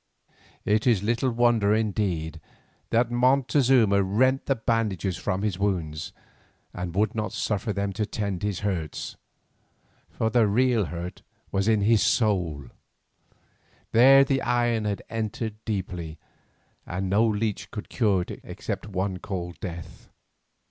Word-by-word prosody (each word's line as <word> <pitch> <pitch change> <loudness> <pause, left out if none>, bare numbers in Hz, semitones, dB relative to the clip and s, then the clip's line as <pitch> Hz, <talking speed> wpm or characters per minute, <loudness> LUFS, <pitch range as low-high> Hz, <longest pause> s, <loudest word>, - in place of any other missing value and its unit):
It 110 +3 +2
is 110 -6 +3
little 120 +4 +1
wonder 115 -3 +3
indeed 90 -7 -1 0.5
that 120 +1 +2
Montezuma 125 -4 +3
rent 130 +8 +1
the 135 - +2
bandages 110 -6 -1
from 95 +1 -2
his 100 -4 -1
wounds 85 -7 -2 0.6
and 90 -1 -5
would 105 +1 +1
not 110 -1 -3
suffer 105 0 -1
them 100 0 -2
to 105 +1 -2
tend 100 -4 -3
his 105 -3 -2
hurts. 90 -7 -3 0.9
For 110 0 -1
the 115 -2 +4
real 120 0 +2
hurt 85 +1 -6 0.3
was 95 +1 0
in 110 -2 +3
his 110 0 +4
soul; 90 - +1 1.3
there 135 +4 +7
the 135 -1 0
iron 120 -2 +1
had 100 -1 -2
entered 110 0 -4
deeply, 90 -6 -4 0.7
and 95 +2 -3
no 100 +4 +3
leech 105 -3 -1
could 105 - -7
cure 100 -7 +1
it - - -8
except - - -5
one 95 -1 -2
called 90 -3 -5
Death. 85 -3 -8
105 Hz, 135 wpm, -26 LUFS, 95-115 Hz, 1.3 s, there